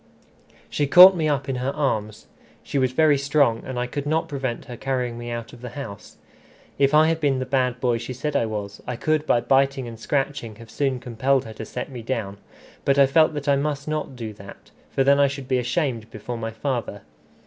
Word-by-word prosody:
She 145 - -1
caught 180 +6 +9
me 155 -3 0
up 140 -2 -1
in 135 -2 -2
her 130 +2 -1
arms. 110 -7 -2 0.4
She 140 - -2
was 130 -1 +2
very 150 +1 +3
strong, 140 -5 +2
and 130 -1 -6
I 125 - 0
could 140 +3 -5
not 160 +2 0
prevent 135 -6 -4
her 125 -3 -8
carrying 125 -1 -2
me 120 0 -7
out 115 -1 -6
of 120 - -13
the 125 +1 -8
house. 100 - -8 0.6
If 140 +1 +4
I 155 +1 +7
had 165 0 +1
been 140 -4 +1
the 130 - -2
bad 125 -1 0
boy 120 -2 +1
she 120 +2 -6
said 145 +4 -4
I 115 - +2
was, 105 -1 -5
I 125 - -2
could 155 +4 0
by 120 - +3
biting 135 -1 +2
and 115 -1 -9
scratching 135 -4 -2
have 115 0 -14
soon 135 -3 -1
compelled 130 +2 0
her 110 - -8
to 110 - -7
set - - -6
me 125 -2 -7
down; 110 -5 -3 0.5
but 140 0 +2
I 140 - +7
felt 155 +3 +3
that 145 0 -5
I 140 -1 +4
must 145 0 -2
not 155 -3 -3
do 115 -3 -6
that, 100 -1 -13 0.2
for 135 - +1
then 140 +1 +4
I 140 - +5
should 140 -1 -6
be 130 -1 +1
ashamed 125 -3 -1
before 110 +3 -6
my 115 -1 -4
father. 115 -3 -4
130 Hz, 225 wpm, -23 LUFS, 115-140 Hz, 0.6 s, caught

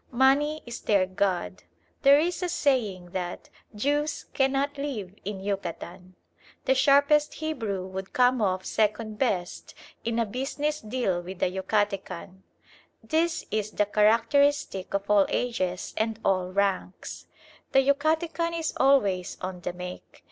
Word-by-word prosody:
Money 290 +4 +3
is 240 -1 -6
their 200 -3 +3
god. 185 -1 -1 0.4
There 280 0 +7
is 345 +4 0
a 360 - -1
saying 215 - 0
that 175 -1 -5 0.2
"Jews 290 +6 0
cannot 275 +1 +1
live 225 -10 -4
in 200 0 -4
Yucatan." 185 -2 -5 0.5
The 265 - +4
sharpest 285 +3 +4
Hebrew 225 -12 -3
would 190 0 -6
come 250 -1 +3
off 185 -2 0
second 215 0 0
best 190 -9 -2 0.3
in 230 0 -1
a 230 - +2
business 280 +7 -2
deal 215 -6 -1
with 185 +1 -6
a 180 - +2
Yucatecan. 190 -1 -2 0.6
This 325 +1 0
is 215 -1 -1
the 210 - +1
characteristic 225 +1 +2
of 200 0 -2
all 205 -2 +4
ages 185 -7 -2
and 220 0 -1
all 185 -1 +1
ranks. 195 -1 -2 0.4
The 270 0 +4
Yucatecan 320 +4 +1
is 325 -1 -2
always 205 -10 +2
"on 185 -1 -5
the 180 - -3
make." 180 0 -9
215 Hz, 135 wpm, -27 LUFS, 190-280 Hz, 0.6 s, There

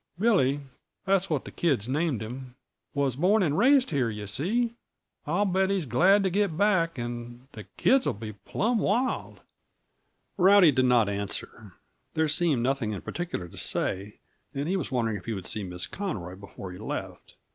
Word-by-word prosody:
Billy 175 - +2 0.4
that's 195 0 +2
what 150 -4 -1
the - - -8
kids 135 -11 0
named 145 -3 0
him 125 +2 -8 0.4
was 140 -3 +1
born 195 +6 +3
and 150 -4 +1
raised 265 - +4
here, 130 -6 +1
yuh 105 -1 -6
see. 215 - -1 0.5
I'll 175 +7 +1
bet 190 0 +1
he's 195 -5 0
glad 185 - +4
to 190 - +1
get 195 -4 0
back 185 -6 +2
and 120 +1 -6
the 105 -6 -10
kids'll 265 0 +3
be 110 +1 -7
plumb 215 - -1
wild." 240 +6 -1 1.0
Rowdy 190 -3 +7
did 130 -1 +2
not 120 -4 +4
answer; 100 0 -5 0.4
there 160 0 +2
seemed 150 -5 +2
nothing 125 -4 0
in 100 - -5
particular 170 - -4
to - - -14
say, 100 +3 -1 0.4
and 140 +2 -2
he 185 - 0
was 180 -7 -3
wondering 115 -4 0
if 90 - -12
he 115 - -2
would 95 -3 -6
see 110 - -2
Miss 90 -1 -2
Conroy 105 - -5
before 100 -1 -9
he 90 - -10
left. - - -6
140 Hz, 175 wpm, -27 LUFS, -, 1.0 s, Rowdy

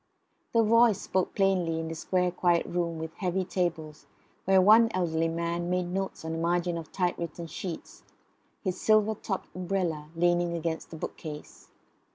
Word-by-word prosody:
The 230 -1 +5
voice 230 -2 +5
spoke 185 -1 -1
plainly 185 -5 +2
in 165 - -3
the 165 - -4
square 180 +2 0
quiet 175 -1 +2
room 170 -1 -2
with 160 0 -6
heavy 185 0 -1
tables, 165 -5 -3 0.4
where 190 0 +5
one 220 +4 +7
elderly 165 -3 +1
man 170 +1 -2
made 180 0 -1
notes 190 -3 -3
on 160 - -3
the 165 - -3
margin 175 +1 0
of 165 -2 -7
typewritten 170 -2 -2
sheets, 165 +1 -7 0.6
his 185 -2 -2
silver 215 0 +4
topped 195 -2 -5
umbrella 175 -5 -2
leaning 175 0 +2
against 165 0 -3
the - - -8
bookcase. 150 -1 -8
175 Hz, 160 wpm, -28 LUFS, 165-190 Hz, 0.6 s, one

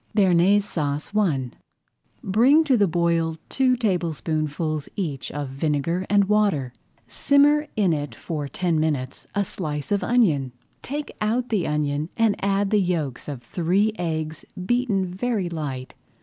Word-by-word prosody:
BEARNAISE 195 0 +4
SAUCE 150 -5 -3
I 145 - +1 0.7
Bring 250 +11 +4
to 280 -5 +3
the 205 -4 +3
boil 165 -1 +1
two 260 -1 +2
tablespoonfuls 155 - -1
each 155 -10 -3
of 145 -1 -4
vinegar 150 +6 -1
and 205 -1 +5
water. 195 -11 +1 0.3
Simmer 295 +2 +3
in 195 -6 +2
it 145 -1 -4
for 150 -4 -4
ten 170 +1 0
minutes 140 -4 -2
a 200 0 +1
slice 150 -5 -5
of 200 - +1
onion. 155 - +2 0.3
Take 290 +2 -5
out 235 +4 0
the 205 -6 0
onion 150 +1 -1
and 225 -3 +3
add 195 0 +1
the 210 -2 +4
yolks 160 -8 -2
of 135 -5 -6
three 185 - +1
eggs 160 -2 -3 0.2
beaten 240 -4 +1
very 190 +1 -2
light. 140 -6 -5
175 Hz, 140 wpm, -24 LUFS, 150-205 Hz, 0.7 s, and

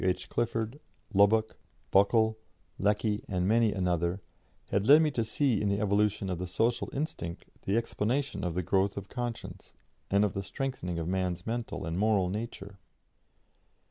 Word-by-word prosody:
H. 90 -1 0
Clifford, 115 +2 -1 0.3
Lubbock, 110 +2 +4 0.3
Buckle, 110 +2 +4 0.4
Lecky, 105 +1 +1
and 90 -2 0
many 115 0 +4
another, 90 -1 0 0.5
had 100 +1 0
led 150 +3 +8
me 155 - +2
to 120 -4 0
see 115 0 +1
in 105 - +1
the 100 0 +1
evolution 105 -1 +1
of 90 -2 -3
the 90 - -3
social 115 +6 0
instinct 135 - -4 0.2
the 100 +3 +2
explanation 115 +2 -1
of 90 -2 -2
the 90 - 0
growth 95 +3 +1
of 100 -1 -6
conscience 120 -2 -6 0.4
and 100 +2 +4
of 100 - -2
the 100 - -2
strengthening 100 -4 -4
of 85 -1 -3
man's 90 -1 -1
mental 115 -6 -3
and 85 +2 -2
moral 105 -4 +2
nature. 100 -1 -6
105 Hz, 160 wpm, -30 LUFS, 95-115 Hz, 0.5 s, led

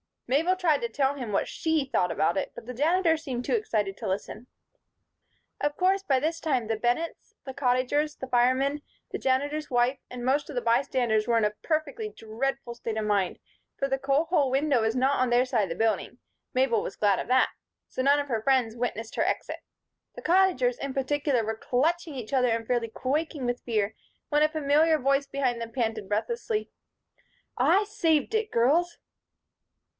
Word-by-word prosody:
Mabel 320 +9 +2
tried 330 -6 +2
to 235 - -2
tell 270 +4 0
him 245 -7 -5
what - - +1
she 320 -3 0
thought 180 -9 0
about 195 +1 +1
it, - - -2
but - - -9
the 250 - -6
Janitor 325 +5 +2
seemed 260 -6 -4
too - - -2
excited 210 - -1
to - - -5
listen. 205 +5 -4 1.1
Of 290 0 -1
course, 380 +2 +2
by 270 -8 +1
this 325 +3 -1
time, 260 -9 0
the 225 0 -1
Bennetts, 245 +9 -2
the 265 - -6
Cottagers, 270 +3 +1
the 260 - -7
firemen, 260 +4 +2 0.3
the - - -4
Janitor's 290 +3 0
wife 245 +2 +1
and 250 -1 -7
most 280 +4 +1
of 295 - -7
the 245 - 0
bystanders 235 -2 +1
were 235 -1 +3
in 225 - +2
a 210 0 +1
perfectly 315 +7 -2
dreadful 240 - -4
state 225 -1 -4
of 215 - -1
mind; 200 -3 0 0.4
for 275 - -1
the 270 0 0
coal 275 +3 +2
hole 320 -5 +1
window 270 -1 +2
was 220 +1 0
not 265 +2 +2
on 255 -1 +2
their 245 +1 +4
side 245 -5 +1
of 190 - -3
the 165 - -3
building 225 0 -1 0.4
Mabel 255 -4 +2
was 195 - -5
glad 205 -2 +2
of - - -4
that 255 +2 +3 0.4
so - - -3
none 280 +2 +4
of 285 0 -4
her 225 -3 0
friends 250 -2 +2
witnessed 230 -2 -4
her - - +1
exit. - - -2 0.6
The - - -9
Cottagers, 340 -9 +3
in 275 -1 -4
particular, 275 -2 0
were 220 0 -3
clutching 310 +6 0
each 245 -1 -7
other 255 -2 +3
and 225 0 -1
fairly 240 -1 0
quaking 280 +3 -2
with 245 0 -2
fear 220 -2 -1 0.3
when 295 0 +2
a 305 - +5
familiar 310 +1 +3
voice 275 0 +1
behind 260 -4 -1
them 230 0 -6
panted 225 -5 -2
breathlessly: 430 - -2 0.9
"I 400 - +4
saved 345 - +1
it, 440 -1 0
girls." 325 +9 +2
260 Hz, 190 wpm, -27 LUFS, 235-300 Hz, 1.1 s, a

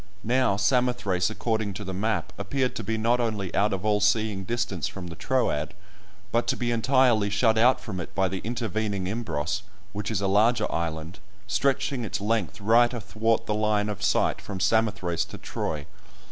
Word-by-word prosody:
Now 125 -3 +2
Samothrace, 100 -4 +1
according 110 -2 -2
to 105 - -5
the 95 -1 -5
map, 105 +4 -1
appeared 125 +6 -1
to - - -4
be 110 0 -1
not 115 +3 +2
only 105 -6 -2
out 105 +2 +2
of 95 +1 -3
all 105 -1 +2
seeing 105 -2 +1
distance 115 -5 -2
from 95 -2 -7
the 85 -1 -7
Troad, 90 - 0 0.6
but 120 +1 +1
to - - +1
be 120 -1 -1
entirely 120 -2 +3
shut 110 +3 +3
out 120 +4 +4
from 95 -5 -6
it 85 - -7
by 95 -1 +2
the 95 +1 -3
intervening 110 -4 -2
Imbros, 95 -4 -2 0.3
which 105 0 -3
is - - 0
a 100 - -1
larger 110 +3 +3
island, 85 +2 -3 0.3
stretching 135 +4 0
its 105 -1 -3
length 105 -1 -1
right 115 +4 +4
athwart 115 -1 -1
the 105 - -1
line 105 0 +1
of 105 - -5
sight - - +1
from 95 -2 -6
Samothrace 105 -5 +1
to - - -10
Troy. 75 -2 -4
105 Hz, 180 wpm, -26 LUFS, 95-115 Hz, 0.6 s, out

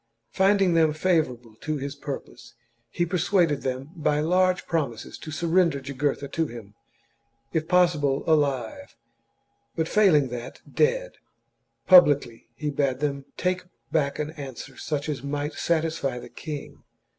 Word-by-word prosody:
Finding 195 -2 +3
them 160 -2 +4
favourable 150 -9 0
to 155 +4 -3
his 140 0 -4
purpose, 140 -3 -8 0.3
he 175 - 0
persuaded 175 -4 +1
them, 130 +3 -4
by 150 -2 +1
large 185 +3 +2
promises, 135 -10 -2
to - - -9
surrender 170 -1 +2
Jugurtha 140 +1 -2
to 165 -1 -1
him, 115 -5 -10 0.8
if 160 -1 0
pos 180 -1 +4
sible 140 -2 0
alive, 135 -8 0 0.8
but, 160 -1 0
failing 165 -11 +4
that, 120 0 -7
dead. - - 0 0.7
Publicly, 145 -10 +5
he 150 -1 -3
bade 140 -2 0
them 140 -2 -2
take 180 0 0 0.3
back 145 -3 +1
an 150 0 -3
answer 140 -5 -8
such 150 -1 -3
as 145 -5 -3
might 145 +2 -3
satisfy 160 -6 -1
the - - -9
king. 150 -3 -8
150 Hz, 135 wpm, -25 LUFS, 140-170 Hz, 0.8 s, Publicly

